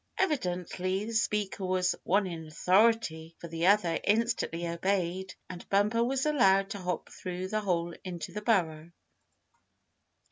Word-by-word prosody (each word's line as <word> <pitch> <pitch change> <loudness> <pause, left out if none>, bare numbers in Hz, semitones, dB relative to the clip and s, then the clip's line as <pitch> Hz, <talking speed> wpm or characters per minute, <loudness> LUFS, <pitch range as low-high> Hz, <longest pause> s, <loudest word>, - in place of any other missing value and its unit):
Evidently 185 - -1
the 230 - -5
speaker 210 -3 0
was 185 -1 +1
one 200 +3 +2
in 165 -3 -6
authority, 180 -1 +2
for 170 - -7
the 165 +1 -1
other 190 -5 +3
instantly 205 -6 0
obeyed, 185 +1 -1
and 180 -1 -9
Bumper 210 +4 +2
was 265 +3 0
allowed 195 -10 +3
to 200 - -4
hop 180 -2 -3
through 185 0 -5
the 215 +1 -1
hole 175 -4 -1
into 180 -3 -6
the 210 - -4
burrow. 170 -8 0
185 Hz, 140 wpm, -30 LUFS, 175-210 Hz, -, other